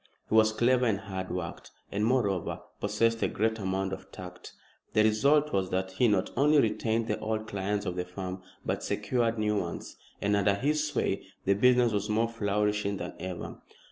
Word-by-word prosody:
He - - -3
was 110 0 +6
clever 125 +3 +3
and 100 -2 0
hard 95 -3 -5
worked, 90 -2 -5 0.2
and, 100 +1 -1
moreover, 105 -7 +1 0.2
possessed 115 +2 +1
a - - +3
great 110 +1 0
amount 95 -1 -1
of - - -8
tact. 90 0 -10 0.4
The 110 - +5
result 140 +8 +3
was 95 -1 +1
that 95 0 -1
he 120 +6 +3
not 100 -4 +1
only 145 +3 +5
retained 110 0 +1
the 105 - -1
old 110 0 -2
clients 100 0 -2
of 90 -2 -2
the 90 0 -2
firm, 90 0 -6 0.2
but - - -1
secured 115 -2 0
new 105 -1 +1
ones, 85 -3 -6 0.2
and 100 0 +1
under 100 0 +3
his 150 +7 +1
sway 145 -4 -1 0.2
the 100 - +4
business 125 +3 +4
was 105 - -1
more 110 +2 +2
flourishing 105 -2 0
than - - -5
ever. 90 -2 -6
105 Hz, 185 wpm, -29 LUFS, 95-115 Hz, 0.4 s, was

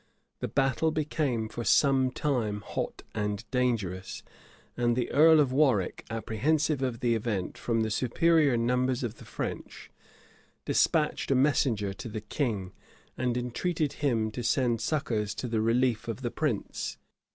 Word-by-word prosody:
The - - -2
battle 135 +3 +1
became 150 -7 -1
for 120 - -6
some 135 0 +4
time 120 -7 -1
hot - - -4
and 105 0 -3
dangerous, 110 -8 -1 0.5
and 120 -1 +1
the 125 -1 -1
earl 160 +2 +6
of 140 -4 +3
Warwick, 130 -9 +1
apprehensive 135 +7 0
of 125 -3 -2
the 120 -2 +2
event, 110 -4 -2
from 115 -1 -1
the 110 0 -1
superior 140 +4 +3
numbers 125 +2 +1
of 115 -1 -4
the - - -13
French, - - -6 0.7
despatched - - +1
a 135 - +3
messenger 125 -7 +2
to 115 +4 -8
the 110 - -4
king, 105 -11 -2 0.4
and 125 -1 -1
entreated 145 +5 -1
him 115 -6 +1
to 120 - -5
send 120 -1 +1
succors 115 -9 -1
to 125 - -4
the 115 -2 0
relief 115 +1 +1
of - - -5
the - - -2
prince. - - -2
125 Hz, 150 wpm, -28 LUFS, 110-135 Hz, 0.7 s, earl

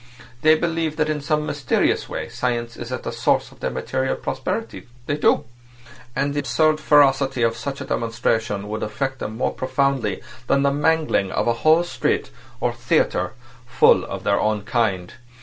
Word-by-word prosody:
They 155 0 +6
believe 165 -1 -1
that 155 0 0
in 150 -1 -2
some 150 +1 0
mysterious 145 -4 0
way - - -4
science 120 -2 -2
is 120 +1 -7
at 130 - -4
the - - -3
source 115 0 +1
of - - -18
their - - -1
material 130 0 -2
prosperity. 135 +12 -4 0.2
They 145 - -1
do. 150 - +2 0.7
And 140 +2 0
the 145 - -1
absurd 155 +4 +2
ferocity 135 -4 +4
of 115 0 +2
such 135 +4 -5
a - - -5
demonstration 115 -4 -1
will 110 +1 -4
affect 135 +5 -3
them 110 +1 -5
more - - 0
profoundly 130 -6 -1 0.2
than 140 - +3
the 140 - +3
mangling 150 -9 +1
of - - -1
a 120 - +3
whole 160 +2 +5
street—or - - -3
theatre—full 120 0 +1
of - - -6
their - - +2
own 105 -1 0
kind. 105 -6 -1
130 Hz, 165 wpm, -22 LUFS, 115-150 Hz, 0.7 s, They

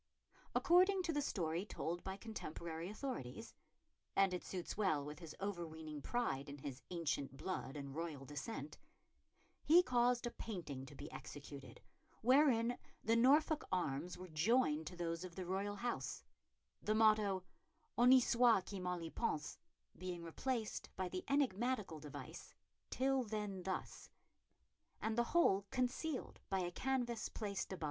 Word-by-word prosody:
According 370 +2 +5
to 335 - 0
the 290 - +1
story 170 - -1
told 175 -4 -3
by 190 0 -4
contemporary 170 -6 -5
authorities 225 - -5 0.6
and 195 -1 +4
it 180 - -2
suits 180 -2 -4
well 170 -9 +2
with 150 +1 -7
his 165 -3 -8
overweening 160 -6 -4
pride 145 - -1
in 140 - -7
his 135 -1 -6
ancient 150 -6 -2
blood 155 -5 -3
and 140 -1 -6
royal 155 -3 -4
descent 145 +1 -5 0.8
he 340 +4 +7
caused 245 -3 +3
a 240 - -1
painting 150 - -5
to 145 - -11
be 145 +2 -8
executed 140 -1 -9 0.4
wherein 245 -2 +5 0.2
the 225 - +3
Norfolk 295 +6 +5
arms 175 -2 -1
were 185 - -8
joined 160 -1 +2
to 180 - -6
those 170 0 -2
of 180 -2 -7
the 185 - -4
royal 195 +3 -1
house, 240 +3 -3 0.6
the 215 - +1
motto 215 -4 +4 0.5
Honi 250 +2 +8
soit 235 -5 +5
qui 200 -1 -5
mal 180 -1 -2
y 165 - -4
pense 150 0 -1 0.4
being 180 -2 -5
replaced 220 +7 -2
by 185 -1 -2
the 185 0 -3
enigmatical 245 - +1
device 150 -2 -8 0.3
Till 265 +1 +2
then 210 -4 -3
thus, 190 +1 -4 0.9
and 220 0 -1
the 240 +1 +3
whole 200 - +4
concealed 255 +3 -1
by 195 - +1
a 175 -1 -2
canvas 245 0 -1
placed 200 -3 -3
above 190 - -3
it. - - -16
190 Hz, 150 wpm, -39 LUFS, 165-240 Hz, 0.9 s, Honi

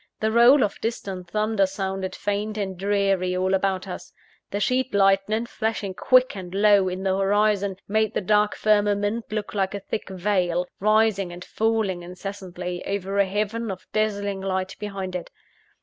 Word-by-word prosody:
The 220 0 +1
roll 240 +4 +6
of 205 - -3
distant 195 -6 -4
thunder 215 0 +1
sounded 190 -1 -3
faint 210 +1 -2
and 195 -2 -3
dreary 195 -1 +1
all 185 +1 +1
about 190 0 0
us. 185 - -7 0.4
The 205 - -2
sheet 255 +3 0
lightning, 195 +3 +3
flashing 220 -4 -3
quick 255 +5 +3
and 185 -1 -7
low 200 -2 +5
in 185 +1 -5
the 190 -1 +1
horizon, 200 0 +2
made 220 +1 +1
the - - +1
dark 210 +2 +2
firmament 205 +1 +1
look 215 -1 -3
like 195 -1 -1
a - - -3
thick 200 +1 -5
veil, 180 -2 0
rising 215 -3 +2
and 175 +1 -9
falling 220 -5 0
incessantly, 180 0 -6
over 200 0 -2
a 200 - +4
heaven 210 +3 -2
of 185 -1 -6
dazzling 205 -2 -1
light 190 -1 -2
behind 195 -3 -5
it. 180 - -5
200 Hz, 165 wpm, -24 LUFS, 190-215 Hz, 0.4 s, roll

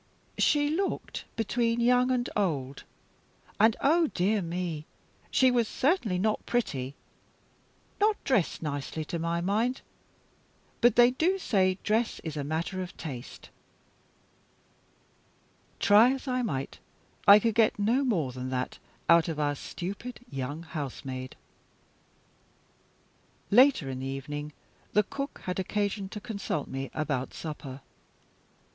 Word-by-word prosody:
"She 290 -1 +3
looked 380 +5 -2
between 230 +1 0
young 250 +1 +4
and 250 -1 +1
old. 140 -9 -1 0.7
And, 220 +1 +5
oh 325 +3 +4
dear 205 -1 +1
me, 170 -3 -4 0.4
she 260 -1 +4
was 240 -2 +2
certainly 255 - +1
not 215 +3 0
pretty. 140 - -1 1.0
Not 420 +1 +4
dressed 215 - +1
nicely, 150 +1 -3
to 170 - -4
my 170 +1 -1
mind; 220 +8 0 1.0
but 240 -1 +5
they 240 0 +7
do 340 +9 +1
say 185 - +2
dress 220 +2 +1
is 160 -2 -5
a 145 - -2
matter 165 +6 -2
of 180 - -7
taste." 130 -6 -8 2.3
Try 215 +5 +6
as 270 +1 -7
I 255 -1 0
might, 140 - -3 0.5
I 200 - +11
could 225 +1 +1
get 220 0 +3
no 230 +7 +2
more 175 - 0
than 130 0 -5
that 130 0 -3 0.3
out 170 0 +6
of 160 -2 -3
our 145 -1 +1
stupid 200 - -6
young 135 +4 -4
housemaid. 135 -5 -6 2.2
Later 250 - +6
in 130 -1 -4
the 135 - -4
evening, 145 +2 -5 0.4
the 210 - +5
cook 275 +7 -6
had 180 0 -3
occasion 200 0 -1
to 210 - -6
consult 200 - -3
me 135 0 -4
about 145 -4 -2
supper. 145 -4 -7
190 Hz, 125 wpm, -29 LUFS, 150-240 Hz, 2.3 s, I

